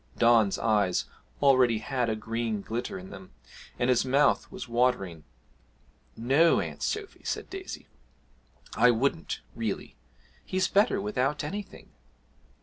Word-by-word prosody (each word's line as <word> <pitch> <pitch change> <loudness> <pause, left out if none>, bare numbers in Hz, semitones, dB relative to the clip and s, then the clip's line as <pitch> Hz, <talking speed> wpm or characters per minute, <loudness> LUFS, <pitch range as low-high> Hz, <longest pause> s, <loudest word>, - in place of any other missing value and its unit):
Don's 115 -4 +4
eyes 105 -5 +1 0.4
already 130 -4 +5
had 120 +2 -1
a 110 - 0
green 110 -1 -3
glitter 115 +1 -4
in 95 0 -10
them 95 -5 -11 0.4
and 120 - 0
his 125 - +3
mouth 140 +3 +2
was - - -7
watering. 115 -10 0 0.9
'No, 135 +9 +4
Aunt - - -5
Sophy,' 420 -2 -4
said - - -4
Daisy, 380 0 -7 0.9
'I 125 - +5
wouldn't 140 +8 0
really. 115 -4 -4 0.5
He's 185 0 0
better 205 +3 +3
without 150 -8 -1
anything.' 200 +7 -7
120 Hz, 125 wpm, -28 LUFS, 110-145 Hz, 0.9 s, already